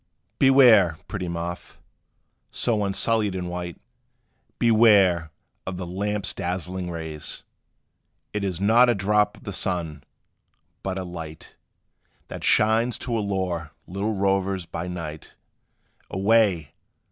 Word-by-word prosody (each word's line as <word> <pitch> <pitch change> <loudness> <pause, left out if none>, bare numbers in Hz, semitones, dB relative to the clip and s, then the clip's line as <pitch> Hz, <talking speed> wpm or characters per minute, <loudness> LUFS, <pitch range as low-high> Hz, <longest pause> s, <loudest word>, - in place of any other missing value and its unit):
Beware, 120 - +6
pretty 95 -3 -4
Moth, 85 +1 -5 0.7
so 110 -3 +1
unsullied 105 +1 +1
and 90 -1 -3
white, 90 -1 -5 0.8
Beware 100 -8 +4 0.4
of 90 -1 -4
the 90 - -5
lamp's 100 +3 -1
dazzling 90 0 -3
rays! 80 -3 -5 0.9
It 105 -1 -2
is 95 -3 -2
not 115 +5 +5
a 120 - +3
drop 105 +1 +1
of - - -18
the 100 - -6
sun! 85 -6 -2 0.8
but 95 0 -3
a 95 - -3
light 80 -3 -9 0.8
That - - -7
shines 110 +3 +3
to 120 - -3
allure 95 -7 -2
little 100 +4 -3
rovers 95 -1 0
by 85 +1 -5
night; 85 -4 -7 0.7
Away! 95 -7 +2
95 Hz, 115 wpm, -24 LUFS, 85-105 Hz, 0.9 s, Beware